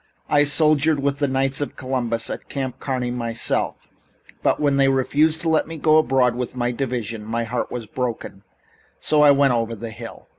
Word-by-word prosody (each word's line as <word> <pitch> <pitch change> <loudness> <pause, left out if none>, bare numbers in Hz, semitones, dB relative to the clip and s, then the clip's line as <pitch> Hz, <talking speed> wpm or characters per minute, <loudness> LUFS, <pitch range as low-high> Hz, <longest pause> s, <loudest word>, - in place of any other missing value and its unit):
I 145 0 +4
soldiered 150 0 +4
with 140 0 -1
the 145 - +1
Knights 135 +1 0
of 145 - -4
Columbus 120 -3 -2
at - - -7
Camp 130 -2 -4
Kearny 125 -3 -2
myself, 115 -2 -2 0.5
but - - +1
when 145 -2 +1
they 135 -1 +4
refused 150 +4 +1
to 165 - -1
let 160 -1 +2
me 165 0 -7
go 155 +1 +4
abroad 130 -4 +2
with 125 +1 -5
my 120 -1 -1
division 120 -4 -4
my 115 +2 -2
heart 120 +2 -3
was 120 -2 -6
broken, 115 -4 -5 0.6
so 150 -1 +2
I 150 - +7
went 140 -2 +4
over 115 -1 -1
the 115 +1 -7
hill." - - -10
130 Hz, 190 wpm, -22 LUFS, 120-145 Hz, 0.6 s, I